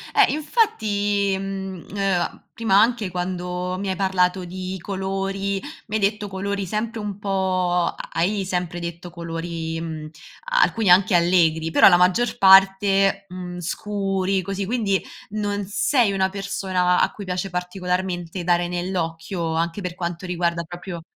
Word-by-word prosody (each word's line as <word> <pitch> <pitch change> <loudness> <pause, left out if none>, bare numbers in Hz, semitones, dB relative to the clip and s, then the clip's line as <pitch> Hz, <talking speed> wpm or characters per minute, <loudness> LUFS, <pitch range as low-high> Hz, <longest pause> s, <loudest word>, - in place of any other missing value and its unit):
eh, 420 -2 +6
infatti, 205 - +1
mhmm, 190 -2 -5
ehm, 195 -3 -1
prima 210 -4 +3
anche 225 -4 +2
quando 180 0 -3
mi 195 +1 -3
hai 190 - -2
parlato 185 -1 +1
di 185 +1 -5
colori, 195 +1 -2 0.3
mi 215 - -3
hai 215 - 0
detto 205 +1 0
colori 200 +1 -3
sempre 220 +4 -3
un 205 -1 -5
po' 185 -3 0 0.2
hai 195 +4 0
sempre 180 -2 -2
detto 170 +1 -6
colori, 165 -1 -5
mhmm, 160 -2 -6 0.5
alcuni 225 -4 +1
anche 185 +2 +6
allegri, 170 -2 +3
però - - +8
la 175 - +6
maggior 185 +7 +2
parte, 195 +1 +5
mhmm, 180 -1 -7
scuri 195 +1 -1
così, 195 +1 -3
quindi 205 -3 0 0.3
non 205 -1 -2
sei 210 +2 +2
una 190 -1 +1
persona 190 -2 0
a - - +2
cui 205 - -9
piace 180 +1 -3
particolarmente 180 -1 -3
dare 175 0 +2
nell'occhio, 170 -1 -3
anche 165 +4 -1
per 180 -2 -4
quanto 175 0 -4
riguarda 170 -1 -1
proprio 175 +1 -7
190 Hz, 140 wpm, -23 LUFS, 175-200 Hz, 0.5 s, però